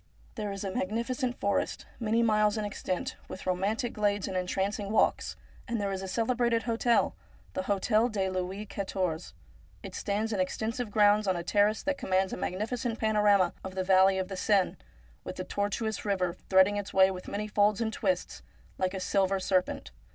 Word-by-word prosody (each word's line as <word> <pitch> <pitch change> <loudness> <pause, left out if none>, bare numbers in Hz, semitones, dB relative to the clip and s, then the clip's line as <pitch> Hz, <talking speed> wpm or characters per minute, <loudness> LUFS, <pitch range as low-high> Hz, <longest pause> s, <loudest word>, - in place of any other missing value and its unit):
There 210 -4 -4
is 195 0 -5
a 195 -1 -3
magnificent 240 +6 -2
forest, 200 - -1
many 230 0 +2
miles 215 -1 +3
in 215 - -1
extent, 185 -3 -3
with 185 - -8
romantic 205 +7 0
glades 205 -1 0
and 190 - -4
en 180 0 -1
trancing 200 +2 -1
walks, 220 - +2 0.3
and 235 -2 -1
there 200 -1 -1
is 190 -1 -3
a 190 - -5
celebrated 230 +2 +1
hotel, 235 0 +2 0.4
the - - -1
Hotel 215 +4 +2
de 195 -4 -1
Louis 185 +2 -3
Quatorze. 185 -5 -3 0.5
It - - -8
stands 215 +2 -1
in 200 - -1
extensive 220 +5 -2
grounds 210 0 +4
on 190 - +2
a 170 - -3
terrace 205 +4 +2
that 285 -1 -1
commands 190 0 +1
a - - -3
magnificent 225 +6 -2
panorama 210 -4 +3
of 190 0 -7
the 190 - 0
valley 190 +1 +5
of 190 -1 -1
the 190 -1 -6
Seine, 195 -2 +2 0.5
with - - -6
the - - -4
tortuous 205 +1 -2
river 185 -4 0 0.2
threading 190 +2 +5
its 205 0 -4
way 190 0 +6
with 185 -1 -7
many 210 +1 -3
folds 205 -1 +2
and 225 -1 -1
twists, 280 +4 -1 0.4
like 185 +1 0
a - - -3
silver 195 +1 +1
serpent. 185 -1 0
205 Hz, 185 wpm, -29 LUFS, 190-220 Hz, 0.5 s, way